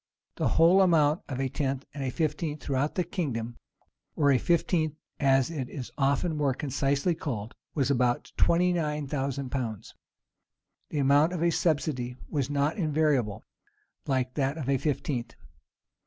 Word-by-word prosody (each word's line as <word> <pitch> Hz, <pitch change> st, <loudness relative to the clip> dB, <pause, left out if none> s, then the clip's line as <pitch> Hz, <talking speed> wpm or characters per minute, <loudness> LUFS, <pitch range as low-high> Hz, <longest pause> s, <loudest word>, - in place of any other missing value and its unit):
The -, -, +1 dB
whole 175 Hz, +4 st, +6 dB
amount 160 Hz, -3 st, +4 dB
of 130 Hz, -2 st, -4 dB
a 135 Hz, -, +1 dB
tenth 135 Hz, 0 st, -2 dB
and 140 Hz, -1 st, -5 dB
a 130 Hz, -, -1 dB
fifteenth 155 Hz, +1 st, -2 dB
throughout 140 Hz, +2 st, -1 dB
the 180 Hz, -, +1 dB
kingdom, 120 Hz, -, -3 dB, 0.6 s
or 145 Hz, -2 st, +3 dB
a 130 Hz, -, +4 dB
fifteenth, 160 Hz, -1 st, +1 dB, 0.2 s
as 135 Hz, 0 st, +3 dB
it 135 Hz, -6 st, -4 dB
is 130 Hz, -4 st, -7 dB
often 140 Hz, +4 st, +1 dB
more 140 Hz, -3 st, +1 dB
concisely 140 Hz, +4 st, 0 dB
called, 115 Hz, -9 st, -5 dB, 0.2 s
was 140 Hz, -1 st, +1 dB
about 125 Hz, -2 st, +1 dB
twenty 180 Hz, +1 st, +3 dB
nine 150 Hz, -3 st, -1 dB
thousand 135 Hz, -1 st, -3 dB
pounds.[] 115 Hz, -6 st, -4 dB, 1.0 s
The -, -, -4 dB
amount 145 Hz, +4 st, +4 dB
of 170 Hz, -2 st, -2 dB
a 170 Hz, -, +3 dB
subsidy 140 Hz, -7 st, 0 dB
was 140 Hz, -5 st, -1 dB
not 145 Hz, +5 st, 0 dB
invariable, 145 Hz, -, +1 dB, 0.6 s
like 130 Hz, -2 st, 0 dB
that 140 Hz, +1 st, -1 dB
of 145 Hz, -5 st, -4 dB
a 135 Hz, -1 st, +2 dB
fifteenth. 130 Hz, -5 st, -2 dB
140 Hz, 155 wpm, -28 LUFS, 130-155 Hz, 1.0 s, whole